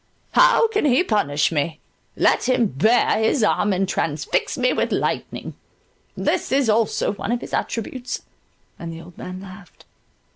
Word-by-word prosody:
How -, -, +5 dB
can 425 Hz, -6 st, 0 dB
he 280 Hz, +5 st, +4 dB
punish 150 Hz, -, +1 dB
me? 155 Hz, +1 st, -2 dB, 0.4 s
Let -, -, +2 dB
him 250 Hz, -2 st, +3 dB
bare 215 Hz, -, +2 dB
his 220 Hz, +2 st, +2 dB
arm 210 Hz, 0 st, +2 dB
and 190 Hz, 0 st, 0 dB
transfix 150 Hz, -5 st, -1 dB
me 250 Hz, -1 st, +2 dB
with -, -, -1 dB
lightning—this -, -, -4 dB
is 265 Hz, -4 st, +3 dB
also 220 Hz, -2 st, +1 dB
one 205 Hz, -, -4 dB
of 240 Hz, 0 st, -1 dB
his -, -, -9 dB
attributes"—and 230 Hz, -7 st, -6 dB
the 165 Hz, -, -8 dB
old 170 Hz, +1 st, -13 dB
man 185 Hz, 0 st, -7 dB
laughed. 190 Hz, -1 st, -13 dB
215 Hz, 145 wpm, -22 LUFS, 170-250 Hz, 0.4 s, How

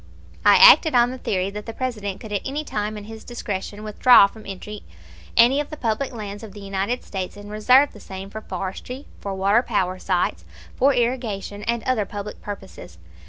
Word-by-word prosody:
I -, -, +7 dB
acted 465 Hz, -, +8 dB
on 240 Hz, 0 st, +4 dB
the 260 Hz, -, -7 dB
theory 190 Hz, -3 st, -1 dB
that 210 Hz, +2 st, -8 dB
the 225 Hz, -, -5 dB
President 210 Hz, -7 st, -4 dB
could 220 Hz, -, -10 dB
at 205 Hz, -, -1 dB
any 285 Hz, +3 st, -3 dB
time 210 Hz, -6 st, -3 dB
in 210 Hz, -, -8 dB
his 220 Hz, +1 st, -10 dB
discretion 205 Hz, -3 st, -5 dB
withdraw 215 Hz, +1 st, +6 dB
from 215 Hz, +2 st, -9 dB
entry 200 Hz, +2 st, -7 dB, 0.6 s
any 250 Hz, +4 st, +6 dB
of 295 Hz, -, -3 dB
the 305 Hz, -, -7 dB
public 235 Hz, +3 st, -1 dB
lands 205 Hz, -4 st, -7 dB
of 215 Hz, -3 st, -10 dB
the 205 Hz, -, -10 dB
United 200 Hz, +4 st, -2 dB
States 190 Hz, 0 st, -5 dB
and 205 Hz, 0 st, -10 dB
reserve 255 Hz, +7 st, +4 dB
the 210 Hz, -, -13 dB
same 195 Hz, 0 st, -9 dB
for 220 Hz, -, -7 dB
forestry, 230 Hz, +8 st, -6 dB
for 200 Hz, -1 st, -5 dB
water 200 Hz, +4 st, +3 dB
power 185 Hz, -6 st, -1 dB
sites, 175 Hz, -, -1 dB, 0.3 s
for 275 Hz, +2 st, +4 dB
irrigation, 235 Hz, -5 st, -2 dB
and 235 Hz, -1 st, -1 dB
other 250 Hz, -5 st, 0 dB
public 205 Hz, +1 st, -7 dB
purposes. 190 Hz, -, -9 dB
210 Hz, 195 wpm, -23 LUFS, 200-245 Hz, 0.6 s, acted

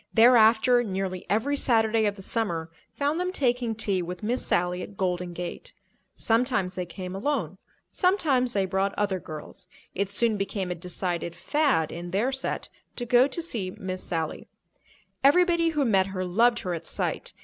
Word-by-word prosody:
Thereafter, 235 Hz, +1 st, +6 dB
nearly 190 Hz, -3 st, -4 dB
every 225 Hz, +9 st, +1 dB
Saturday 225 Hz, -4 st, +2 dB
of 205 Hz, -, -1 dB
the 195 Hz, -, -11 dB
summer 170 Hz, -8 st, -2 dB, 0.2 s
found 290 Hz, +3 st, 0 dB
them 365 Hz, 0 st, -1 dB
taking 245 Hz, -7 st, 0 dB
tea 200 Hz, -4 st, 0 dB
with 180 Hz, +3 st, -6 dB
Miss 240 Hz, +4 st, -1 dB
Sally 180 Hz, +1 st, 0 dB
at 200 Hz, -, -9 dB
Golden 180 Hz, -1 st, -1 dB
Gate. 180 Hz, -, -6 dB, 0.4 s
Sometimes 225 Hz, -5 st, +1 dB
they 180 Hz, -1 st, -4 dB
came 180 Hz, +1 st, -7 dB
alone; 195 Hz, -, -2 dB, 0.3 s
sometimes 295 Hz, -10 st, +2 dB
they 195 Hz, -2 st, +1 dB
brought 195 Hz, +1 st, -1 dB
other 200 Hz, -2 st, 0 dB
girls. 155 Hz, +3 st, -10 dB, 0.3 s
It 195 Hz, +1 st, -1 dB
soon 220 Hz, +1 st, +1 dB
became 195 Hz, -2 st, -3 dB
a -, -, +1 dB
decided 175 Hz, 0 st, -4 dB
"fad" 190 Hz, -, +1 dB
in 175 Hz, +1 st, -6 dB
their 210 Hz, +9 st, 0 dB
set 270 Hz, 0 st, -3 dB, 0.3 s
to 245 Hz, -, -4 dB
go 245 Hz, +2 st, +5 dB
to 285 Hz, +5 st, -3 dB
see 220 Hz, -, -3 dB
Miss 185 Hz, -3 st, -5 dB
Sally. 165 Hz, -3 st, -3 dB, 0.8 s
Everybody 340 Hz, +3 st, +4 dB
who 300 Hz, -4 st, 0 dB
met 195 Hz, -5 st, +3 dB
her 185 Hz, -1 st, -3 dB
loved 230 Hz, +7 st, +3 dB
her 180 Hz, -, -3 dB
at 165 Hz, -1 st, -5 dB
sight. -, -, -3 dB
205 Hz, 170 wpm, -26 LUFS, 180-250 Hz, 0.8 s, Thereafter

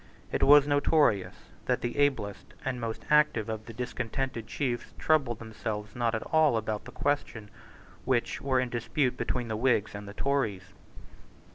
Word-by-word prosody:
It -, -, -1 dB
was 145 Hz, 0 st, +8 dB
notorious 145 Hz, -, +2 dB, 0.3 s
that -, -, +1 dB
the 120 Hz, 0 st, -3 dB
ablest 130 Hz, -8 st, 0 dB
and 130 Hz, -2 st, -2 dB
most 115 Hz, -1 st, -4 dB
active 150 Hz, -8 st, +4 dB
of 110 Hz, -1 st, -5 dB
the -, -, -7 dB
discontented 125 Hz, 0 st, -3 dB
chiefs 120 Hz, -1 st, -3 dB
troubled 140 Hz, -8 st, +2 dB
themselves 110 Hz, -1 st, -5 dB
not 120 Hz, -2 st, 0 dB
at 110 Hz, -, -3 dB
all 155 Hz, -6 st, +3 dB
about 110 Hz, -1 st, -3 dB
the -, -, -9 dB
questions 130 Hz, -6 st, -2 dB, 0.5 s
which 125 Hz, -2 st, 0 dB
were 130 Hz, -2 st, +2 dB
in 125 Hz, -1 st, -1 dB
dispute 125 Hz, +2 st, 0 dB
between 125 Hz, -1 st, -2 dB
the 110 Hz, -, -2 dB
Whigs 110 Hz, -3 st, +1 dB
and 100 Hz, 0 st, -7 dB
the 100 Hz, -, -9 dB
Tories. 105 Hz, -10 st, -1 dB
120 Hz, 160 wpm, -29 LUFS, 110-140 Hz, 0.5 s, was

